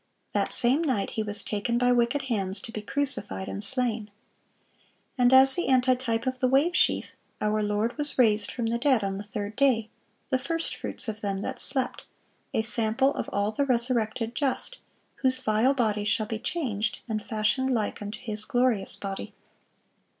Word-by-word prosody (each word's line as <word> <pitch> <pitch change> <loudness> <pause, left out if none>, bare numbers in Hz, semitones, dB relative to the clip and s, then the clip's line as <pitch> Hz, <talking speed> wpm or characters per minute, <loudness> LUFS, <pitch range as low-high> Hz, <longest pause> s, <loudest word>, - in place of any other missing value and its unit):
That - - 0
same 255 +5 +5
night 255 -10 0
He 220 - -2
was 205 -1 0
taken 210 +4 -1
by 245 0 +3
wicked 245 +3 +2
hands, 200 -6 -1
to 225 - -8
be 215 - -5
crucified 215 -5 -3
and 200 - -5
slain. 230 -2 -1 1.1
And 245 -1 +4
as 265 +1 +7
the 350 - -1
antitype 255 -3 +2
of 255 0 -2
the 255 - +3
wave 285 +7 +3
sheaf, - - +2 0.3
our 215 0 +1
Lord 210 +3 0
was 295 0 0
raised 215 -4 +3
from 240 - -3
the 230 +1 0
dead 260 -4 +3
on 195 0 -2
the - - -5
third 205 0 -5
day, 245 -6 +2 0.4
"the 260 - +2
first 330 +5 -2
fruits - - -5
of 215 -1 -4
them 195 -1 -2
that - - -4
slept,"(653) 260 -3 -4
a - - +1
sample 230 +4 +1
of - - -4
all 200 +1 0
the 250 +6 0
resurrected 235 -3 0
just, 280 - -2 0.4
whose 260 -1 +1
"vile 240 +3 +2
body" 215 -5 +1
shall 205 +1 +1
be 220 0 -4
changed, 230 -9 -2
and 215 -2 -2
"fashioned 235 +4 0
like 220 -4 -1
unto 205 +1 -6
His 215 -3 -4
glorious 245 -4 +1
body." 195 -1 -6
235 Hz, 180 wpm, -27 LUFS, 210-260 Hz, 1.1 s, as